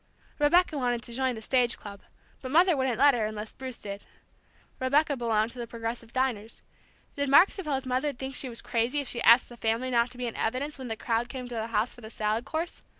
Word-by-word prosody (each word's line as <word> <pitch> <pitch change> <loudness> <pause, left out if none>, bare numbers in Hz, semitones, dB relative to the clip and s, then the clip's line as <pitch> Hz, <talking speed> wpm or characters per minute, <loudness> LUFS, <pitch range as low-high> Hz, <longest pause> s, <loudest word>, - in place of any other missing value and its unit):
Rebecca 305 +1 +3
wanted 245 -2 0
to 235 - -9
join 260 0 0
the 220 - -8
Stage 250 0 +2
Club, 200 -2 -10 0.4
but 255 - -6
Mother 345 +4 +5
wouldn't 260 -4 0
let 285 +2 +6
her 225 -3 0
unless 215 0 -6
Bruce 260 -2 -7
did. 200 0 -7 0.8
Rebecca 285 +3 +2
belonged 230 -2 +1
to 250 - -9
the 235 - -4
Progressive 230 0 -5
Diners. 240 -4 -2 0.5
Did 285 -1 -1
Mark 315 +8 +7
suppose 295 -8 -3
Mother'd 255 +2 -1
think 265 0 -5
she 260 - -3
was 235 - -7
crazy 235 +5 0
if 280 - -4
she 240 - -2
asked 235 +2 +7
the 240 - -12
family 230 +3 -1
not 235 0 +3
to 250 - -14
be 250 - -3
in 235 - -4
evidence 270 +6 -2
when 260 - -6
the 225 -1 -4
crowd 235 +1 -1
came 255 -1 -6
to - - -5
the 225 -1 -2
house 230 +1 0
for 240 - -15
the 220 - -9
salad 220 +1 -1
course? 325 +2 -4
245 Hz, 230 wpm, -28 LUFS, 230-265 Hz, 0.8 s, Mark